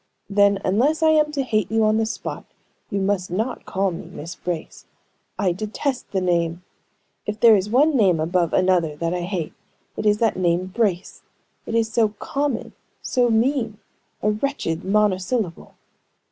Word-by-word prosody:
"Then, 200 0 +4
unless 275 - +2
I 315 - +6
am 305 -1 +3
to 280 -2 0
hate 215 -6 0
you 225 0 +2
on 215 0 +3
the 220 0 +1
spot, 225 - -5 0.4
you 200 - -1
must 190 -1 0
not 220 +8 -3
call 195 0 0
me 170 - -7
Miss 165 +4 -8
Brace. 175 -2 -6 0.5
I 190 -3 +1
detest 215 +8 -3
the 195 - 0
name! 170 -1 0 0.6
If 210 0 -3
there 230 -2 +7
is 200 +1 0
one 285 +6 +4
name 190 -9 +4
above 170 +1 +1
another 180 -5 +2
that 165 +3 -2
I 180 - -2
hate, 175 -3 -3 0.4
it 215 - -1
is 210 0 +4
that 225 -1 +1
name 175 0 +1
Brace! 190 -2 -2 0.5
It 225 - -2
is 225 -1 +1
so 220 -3 +2
common, 280 +1 -2 0.3
so 245 -2 +2
mean 230 -1 +1 0.5
a 210 - +3
wretched 210 - -2
monosyllable!" 200 -1 0
205 Hz, 165 wpm, -22 LUFS, 180-230 Hz, 0.6 s, there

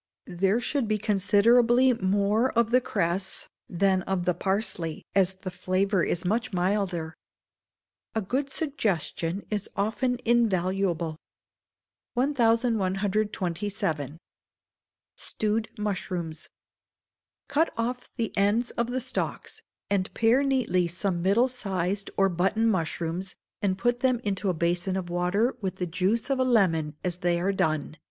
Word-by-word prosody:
There 190 +5 +1
should 265 -1 -1
be 215 0 +1
considerably 230 +5 +4
more 205 +4 +1
of 235 0 +2
the 255 +1 +5
cress 190 -3 -1 0.2
than 190 +1 +2
of 185 -2 0
the 180 - +2
parsley, 190 -3 -2
as 190 -1 +3
the 185 0 -7
flavour 185 +1 0
is 175 +1 -1
much 220 +5 0
milder. 180 -3 -1 1.0
[A 220 - +1
GOOD 270 +8 -1
SUGGESTION 200 - -2
IS 210 -2 -2
OFTEN 230 +5 0
INVALUABLE.] 185 -7 +1 1.0
1127. 205 - 0 1.0
Stewed 215 +1 -1
Mushrooms. 180 -6 -3 1.0
Cut 320 +4 +2
off 245 +2 -3
the 230 -3 -2
ends 210 +5 +2
of 235 - -1
the 255 +1 -2
stalks, 255 - -3 0.3
and 195 -2 +1
pare 230 +4 +4
neatly 255 -10 +1
some 175 +1 -2
middle 200 +8 +3
sized 195 -5 -2
or 195 - +5
button 190 +5 +1
mushrooms, 175 -2 -1 0.3
and 190 -2 +1
put 240 +3 +1
them 255 -2 +2
into 200 -1 -1
a 180 - 0
basin 175 +3 0
of 180 -2 -4
water 180 +8 +1
with 190 -2 -2
the 180 - -2
juice 190 +9 0
of 270 - +1
a - - +4
lemon 175 - +2
as 180 -2 -1
they 175 -1 +1
are 195 +3 0
done. 155 -3 -1
195 Hz, 130 wpm, -27 LUFS, 180-230 Hz, 1.0 s, the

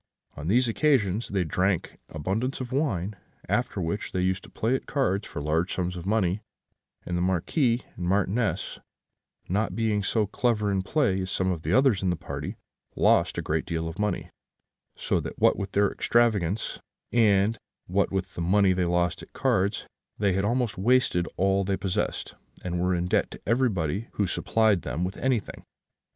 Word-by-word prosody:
On 75 - -6
these 120 +6 +3
occasions 115 -5 +2
they 95 -2 0
drank 90 +3 -1
abundance 100 - -2
of 130 -2 -5
wine; 110 - -1 0.3
after - - 0
which 90 +5 -3
they 90 - 0
used 95 +1 0
to - - -14
play 115 +3 -1
at 130 - -2
cards 105 -8 0
for 75 - -6
large 80 +4 0
sums 90 0 -2
of 90 +1 -6
money; 100 -2 +1 0.6
and 90 - -3
the 85 - 0
Marquis 115 - +1
and 90 - -4
Marchioness 100 0 0 0.7
not 105 +5 0
being 110 -2 +1
so 105 +2 +1
clever 105 -1 0
in 95 -1 +1
play 95 -3 +1
as 95 - -4
some 95 0 0
others 95 - +2
of 95 - +1
the 90 - +1
party, 85 - -6 0.4
lost - - +3
a - - -2
great - - 0
deal 80 -1 -2
of 80 +3 -7
money; 105 -4 -1 0.6
so - - 0
that - - -6
what - - +4
with 100 -1 -5
their 100 0 +3
extravagance, 110 -5 +1 0.3
and 105 -1 +3 0.3
what 95 +2 +1
with 95 -1 -2
the - - -5
money 95 +2 +4
they 90 -1 0
lost 85 0 0
at - - -14
cards, 95 +2 +1 0.3
they 100 -2 +2
had 95 +1 0
almost 120 -2 0
wasted 110 -5 +3
all 95 +1 +2
they 95 0 -1
possessed, 95 0 -2 0.3
and 90 -1 -2
were 90 0 +2
in 85 0 -1
debt 90 - +1
to - - -10
everybody 110 - 0
who 100 - +1
supplied 105 +1 +2
them 75 +7 -3
with 95 +2 -3
anything. 130 -4 -1
95 Hz, 175 wpm, -27 LUFS, 90-110 Hz, 0.7 s, what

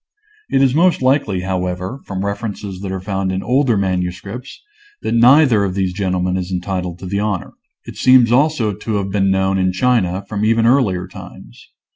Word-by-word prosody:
It 135 - +2
is 130 -2 +3
most 170 -2 +2
likely, 130 -8 +1
however, 90 +5 -3
from 95 0 -4
references 100 -2 -5
that 95 -1 -5
are 95 - -3
found 95 0 -2
in 95 +1 -3
older 125 -1 +2
manuscripts, 95 +5 -4 0.4
that - - -1
neither 120 -1 +5
of 95 -2 -2
these 95 -2 -1
gentlemen 90 -1 -1
is 90 0 -4
entitled 90 -1 -3
to 95 - -10
the 100 +2 -2
honor. 105 -3 -3 0.3
It - - -10
seems 125 -3 +5
also 130 -5 +2
to 110 +3 -4
have 100 -1 -2
been 95 -1 +1
known 95 0 +1
in 95 0 +1
China 95 -3 0
from 105 -1 -3
even 115 +1 +2
earlier 105 -8 +2
times. - - -13
100 Hz, 180 wpm, -18 LUFS, 95-120 Hz, 0.4 s, neither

